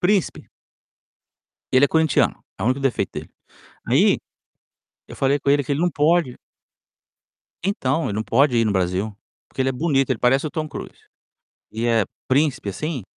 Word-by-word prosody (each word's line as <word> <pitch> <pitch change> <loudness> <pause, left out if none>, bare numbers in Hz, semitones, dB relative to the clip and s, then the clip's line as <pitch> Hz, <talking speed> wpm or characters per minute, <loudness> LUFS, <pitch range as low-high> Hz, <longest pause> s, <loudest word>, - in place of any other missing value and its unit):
Príncipe. 195 0 0 1.2
Ele 130 +2 +6
é - - 0
corinthiano, 160 -1 +2 0.2
é - - -5
o - - 0
único 130 +2 +1
defeito 135 -3 -1
dele. - - -7 0.6
Aí, - - +4 0.9
eu - - -10
falei 140 +1 +1
com 140 - -1
ele 145 0 +3
que 135 - -4
ele 140 - 0
não 175 - +3
pode 160 -3 +1 1.3
Então, 160 - 0
não 110 +2 -2
pode 125 +2 +3
ir 115 - +3
no 110 - +1
Brasil, 95 +2 -1 0.3
porque 130 - -4
ele 130 - +1
é - - 0
bonito, 135 0 0
ele 130 - 0
parece 135 +4 +2
o - - -9
Tom 155 -2 -3
Cruise. - - -9 0.7
E 115 +2 -3
é 115 -2 +3 0.2
príncipe, 135 -5 +1
assim, 145 - -4
135 Hz, 170 wpm, -22 LUFS, 120-155 Hz, 1.3 s, Ele